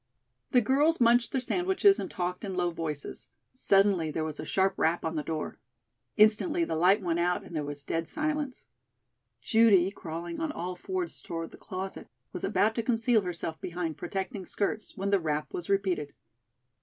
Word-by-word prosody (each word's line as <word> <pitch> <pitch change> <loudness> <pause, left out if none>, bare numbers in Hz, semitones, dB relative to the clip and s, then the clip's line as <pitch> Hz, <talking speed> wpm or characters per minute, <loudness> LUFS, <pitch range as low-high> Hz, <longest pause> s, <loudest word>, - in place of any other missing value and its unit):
The 250 - +5
girls 285 +8 +3
munched 240 0 +4
their 265 - +1
sandwiches 380 - +3
and - - -4
talked 180 +2 -3
in 195 -3 -4
low 175 -1 +1
voices. 155 -4 -5 0.2
Suddenly 195 -8 +3
there 155 +1 -2
was 155 -1 -5
a - - -4
sharp 190 0 +2
rap 165 0 +1
on 160 0 -2
the 155 - 0
door. 155 0 -4 0.6
Instantly 220 +11 +4
the 325 - -2
light 190 +5 +4
went 170 -1 0
out 175 +1 +1
and 170 - -10
there 150 - -1
was 145 0 -6
dead 165 +2 -2
silence. 300 -3 -2 0.8
Judy, 195 - +5
crawling 170 -2 -6
on 320 -2 -1
all 180 - -4
fours 370 - -4
toward 165 -1 -5
the - - -12
closet, 190 +1 -6 0.3
was - - -6
about 220 +1 +2
to 230 - -1
conceal 230 -1 +2
herself 170 -3 -5
behind 170 -2 -3
protecting 190 - -4
skirts, 215 +1 -3
when 195 +1 -1
the 200 - +4
rap 150 -3 -2
was 175 - -5
repeated. 185 -7 0
190 Hz, 180 wpm, -29 LUFS, 165-230 Hz, 0.8 s, The